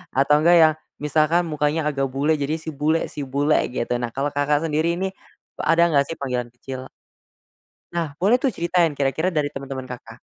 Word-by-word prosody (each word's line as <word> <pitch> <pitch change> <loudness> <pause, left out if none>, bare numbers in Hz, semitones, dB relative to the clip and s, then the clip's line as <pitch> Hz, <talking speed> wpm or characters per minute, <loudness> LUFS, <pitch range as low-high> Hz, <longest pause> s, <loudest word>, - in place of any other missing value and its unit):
atau 140 +2 +4
enggak 170 +3 +5
yang 155 0 +5 0.3
misalkan 155 +4 +2
mukanya 150 +1 0
agak 135 -1 -1
bule, 140 +4 0
jadi 145 +2 -1
si 160 0 -6
bule 155 +3 0
si - - -8
bule 145 +3 +2 0.2
gitu. 120 - -2
Nah, 120 - -2
kalau 140 +2 -1
Kakak, 145 +2 +1
sendiri 160 +2 0
nih, 190 +2 -2 0.5
ada 165 +1 +3
enggak 140 -2 +3
sih 165 - -5
panggilan 125 -4 -3
kecil? 130 +1 -7 1.1
Nah, 170 -2 -1
boleh 215 +9 +3
tuh 270 - +2
ceritain 170 -3 +1
kira-kira 140 +5 0
dari 150 -5 -1
teman-teman 135 -1 -6
Kakak. 125 -3 -10
150 Hz, 180 wpm, -22 LUFS, 135-165 Hz, 1.1 s, enggak